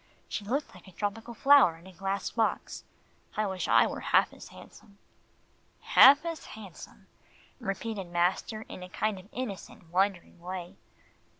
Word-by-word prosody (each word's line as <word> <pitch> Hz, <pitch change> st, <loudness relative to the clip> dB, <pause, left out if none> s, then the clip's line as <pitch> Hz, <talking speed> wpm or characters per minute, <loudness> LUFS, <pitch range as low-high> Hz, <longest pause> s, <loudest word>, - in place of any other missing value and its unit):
She 210 Hz, -, -4 dB
looked 270 Hz, +8 st, -2 dB
like -, -, -16 dB
a -, -, -13 dB
tropical 220 Hz, +5 st, -4 dB
flower 275 Hz, -11 st, +6 dB
in 165 Hz, -, -18 dB
a 190 Hz, -, -13 dB
glass 195 Hz, +2 st, -3 dB
box. 225 Hz, -1 st, -1 dB, 0.5 s
I 215 Hz, -, +1 dB
wish 190 Hz, -2 st, -3 dB
I -, -, +5 dB
were -, -, -4 dB
half -, -, +2 dB
as -, -, -12 dB
handsome." 200 Hz, -1 st, -16 dB, 0.8 s
"Half 280 Hz, +4 st, +7 dB
as 330 Hz, -1 st, -4 dB
handsome," 205 Hz, -5 st, -12 dB, 0.5 s
repeated 205 Hz, -2 st, -4 dB
master 180 Hz, +5 st, 0 dB
in 185 Hz, -, -10 dB
a 180 Hz, -, -8 dB
kind 215 Hz, +1 st, -2 dB
of 190 Hz, +3 st, -16 dB
innocent, 200 Hz, -8 st, -7 dB
wondering 185 Hz, -1 st, 0 dB
way. 180 Hz, +1 st, -7 dB
200 Hz, 155 wpm, -29 LUFS, 185-220 Hz, 0.8 s, Half